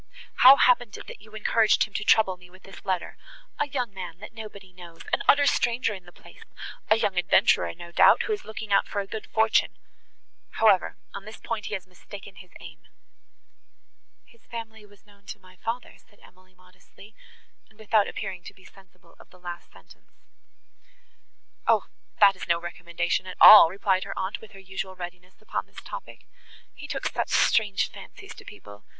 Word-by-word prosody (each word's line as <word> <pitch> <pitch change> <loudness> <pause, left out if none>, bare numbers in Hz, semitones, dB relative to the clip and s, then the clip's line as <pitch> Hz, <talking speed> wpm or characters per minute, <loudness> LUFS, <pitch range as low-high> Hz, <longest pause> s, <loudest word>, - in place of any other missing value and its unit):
"How 260 +2 +9
happened 245 -5 +2
it - - -11
that - - -11
you 215 0 -16
encouraged 215 0 +2
him 210 - -7
to 210 - -3
trouble 210 -3 +3
me 180 0 -18
with 185 +1 -19
this 195 - -14
letter?—A 200 - -5
young 250 -7 -3
man 180 -3 -8
that 210 +4 -11
nobody 205 -4 -11
knows;—an 170 -2 -5
utter 285 0 +5
stranger 240 -4 +1
in 185 -3 -10
the 175 - -15
place,—a 215 - -5
young 200 -4 0
adventurer, 85 - +3
no 170 0 -11
doubt, - - +5
who 435 - -2
is 415 - -5
looking 220 -1 -5
out - - +3
for 205 - -4
a 200 - -3
good 215 +2 -7
fortune. 220 0 +1 0.8
However, 210 -5 +2 0.2
on 200 0 -8
that 215 +1 -12
point 225 -4 -4
he - - -3
has 190 - -7
mistaken 195 +1 -13
his 180 +1 -14
aim." 160 -2 -13 1.4
"His 235 -1 -25
family 220 -2 -9
was 205 0 -23
known 200 -1 -24
to - - -8
my 185 -1 -19
father," 230 +6 -5
said 205 - -27
Emily 185 0 -22
modestly, 185 +3 -19 0.6
and 220 - -26
without 215 -1 +1
appearing 190 -4 -6
to - - -11
be 190 - -20
sensible 185 -3 -21
of - - -18
the 180 - -20
last 175 -1 -9
sentence. - - -21 1.4
"O! - - +3 0.3
that 200 -2 +6
is - - -9
no 170 0 +2
recommendation 175 +1 -3
at 185 - -8
all," 210 -6 +10
replied 190 0 0
her - - -7
aunt, 190 +1 -4
with 215 -1 -15
her 195 - -13
usual 190 0 -7
readiness 180 +1 -10
upon - - -4
this - - -12
topic; - - -10 0.5
"he - - -10
took - - -5
such - - -2
strange 205 -4 +2
fancies - - -12
to - - -14
people! 105 0 -14
195 Hz, 180 wpm, -25 LUFS, 180-220 Hz, 1.4 s, all